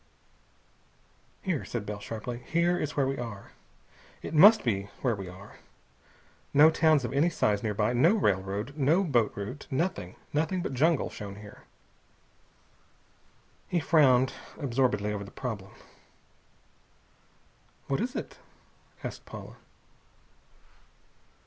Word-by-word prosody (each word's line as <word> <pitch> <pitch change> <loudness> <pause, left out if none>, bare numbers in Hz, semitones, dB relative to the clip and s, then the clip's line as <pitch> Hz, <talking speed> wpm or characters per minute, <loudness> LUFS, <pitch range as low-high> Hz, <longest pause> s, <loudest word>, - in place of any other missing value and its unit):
"Here," 180 -8 -1
said 115 -4 -4
Bell 105 0 -5
sharply. 115 +3 -6
"Here 170 +1 +2
is 150 - -3
where 140 - +3
we 135 0 -2
are. 115 -5 -7 0.7
It - - -6
must 205 +8 +8
be 100 -4 -1
where 120 -4 +1
we 95 -2 -7
are! 95 +3 -13 1.0
No 155 +3 +8
towns 155 -4 +3
of 120 - -4
any 145 +5 +3
size 105 -10 +1
nearby. 105 +1 0
No 160 - +4
railroad. 105 - -1
No 155 +6 +3
boat 120 - +2
route. 105 +8 -6
Nothing! 130 - -2 0.2
Nothing 165 +4 0
but - - -3
jungle 155 +4 +2
shown 100 -1 -7
here!" 105 +1 -13 2.0
He 175 - 0
frowned 135 -5 +4 0.2
absorbedly 120 -7 0
over 100 -1 -4
the 100 - -10
problem. 105 -6 -6 2.1
"What 135 - -1
is 250 +3 -3
it?" - - -6 0.6
asked - - -6
Paula. - - -10
125 Hz, 120 wpm, -28 LUFS, 105-155 Hz, 2.1 s, must